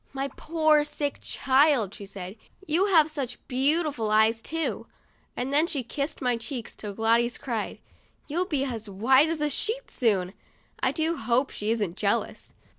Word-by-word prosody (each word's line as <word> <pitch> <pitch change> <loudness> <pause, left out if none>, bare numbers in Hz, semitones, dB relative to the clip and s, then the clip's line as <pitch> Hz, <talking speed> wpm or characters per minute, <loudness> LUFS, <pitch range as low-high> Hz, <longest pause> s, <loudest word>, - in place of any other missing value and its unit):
" - - -35
My 270 +1 -2
poor 310 +1 +2
sick 295 -1 -3
child/' 265 -6 +2
she 200 -4 -9
said; 190 0 -8 0.3
"you 360 +4 +2
have 320 -5 +4
such 270 -5 -4
beau 280 +7 +2
tiful 255 -8 -2
eyes, 220 +1 +3
too," 325 +4 -3 0.5
and 260 +3 -2
then 305 +3 +4
she 280 -6 0
kissed 280 +4 -4
my 245 -2 +2
cheeks 230 0 -6
till 205 -2 -7
Gladys 230 +2 +2
cried, 230 -5 -4 0.3
" - - -38
You'll 350 +5 -1
be 290 -7 0
as 225 -5 -5
white 260 +10 +4
as 325 -2 -2
a 300 - +1
sheet, 465 - -2
soon." 195 -7 +1 0.5
I - - +2
do 325 +1 -1
hope 240 +4 +1
she 210 - -3
isn't 210 -6 -1
jealous. - - -1
265 Hz, 180 wpm, -26 LUFS, 225-305 Hz, 0.5 s, have